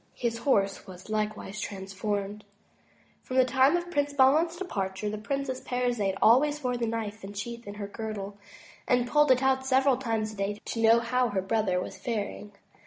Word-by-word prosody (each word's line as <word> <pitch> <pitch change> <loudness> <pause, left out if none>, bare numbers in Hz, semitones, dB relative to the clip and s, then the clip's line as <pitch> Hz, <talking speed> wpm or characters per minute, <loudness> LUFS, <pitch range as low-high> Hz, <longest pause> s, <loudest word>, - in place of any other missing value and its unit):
His 230 -1 -2
horse 200 -6 +2
waB 185 +3 -10
likewise 215 -1 -2
transformed. 200 +1 -4 0.8
From 255 - -6
the 260 - +6
time 265 +5 +4
of 350 0 -5
Prince 285 -2 0
Bahman's 295 +5 +4
departure, 205 - -3
the 215 - -4
Princess 270 +3 -3
Parizade 240 -6 -1
always 290 +6 +4
wore 250 -1 0
the 235 -1 -1
knife 220 -2 -4
and 200 +1 -8
sheath 235 +2 -6
in 205 - -6
her 205 -1 -5
girdle, 205 -1 -6 0.5
and 245 -1 +2
pulled 295 +2 +4
it 255 +1 +4
out 265 0 +2
several 265 0 +3
times 225 -4 -2
a - - -11
day 200 +1 -2
to 230 - -3
know 230 +1 +6
how 250 +1 +1
her 195 -3 -1
brother 195 -3 +1
was - - -6
faring. 210 -2 -4
230 Hz, 180 wpm, -28 LUFS, 205-260 Hz, 0.8 s, the